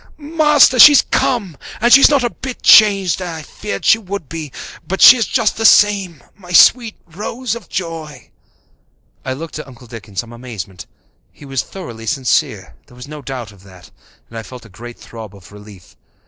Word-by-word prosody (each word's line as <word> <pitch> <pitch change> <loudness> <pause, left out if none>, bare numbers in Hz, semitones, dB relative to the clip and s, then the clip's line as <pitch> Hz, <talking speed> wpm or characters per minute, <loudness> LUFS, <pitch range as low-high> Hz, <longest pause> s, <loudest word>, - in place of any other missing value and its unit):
"Master, 300 -4 +2
she's 290 +3 +8
come. 240 - -2 0.2
And 240 +2 +2
she's 275 - +7
not 285 -4 +1
a 240 - -2
bit 260 -2 -9
changed. 195 -4 +4
I 165 -3 -7
feared 100 -8 -8
she 220 - +4
would 200 -6 -8
be, 155 -2 -8 0.4
but 190 +1 -4
she - - +8
is 235 -3 -2
just 230 -5 -1
the 225 - -4
same 200 -7 +2
my 180 -3 -15
sweet 225 +5 +4
little 175 +4 -14
Rose 240 +2 -5
of 235 -6 -10
joy!" 165 -4 -8 0.9
I 130 - -4
looked 155 +3 -9
at 155 - -10
Uncle 125 -1 -16
Dick 115 -2 -12
in 100 - -18
some 120 +4 -6
amazement. 110 -7 -10 0.4
He - - -17
was 135 -2 -3
thoroughly 115 -12 -11
sincere, 130 +2 -2
there 125 - -20
was 125 +2 -11
no 150 0 -10
doubt 125 -5 -8
of 100 -2 -20
that, 95 -2 -18 0.4
and 115 - -9
I - - -7
felt 125 +1 -13
a - - -16
great 120 +5 -12
throb 110 -3 -12
of 90 -2 -18
relief. 105 -3 -16
160 Hz, 190 wpm, -15 LUFS, -, 0.9 s, she's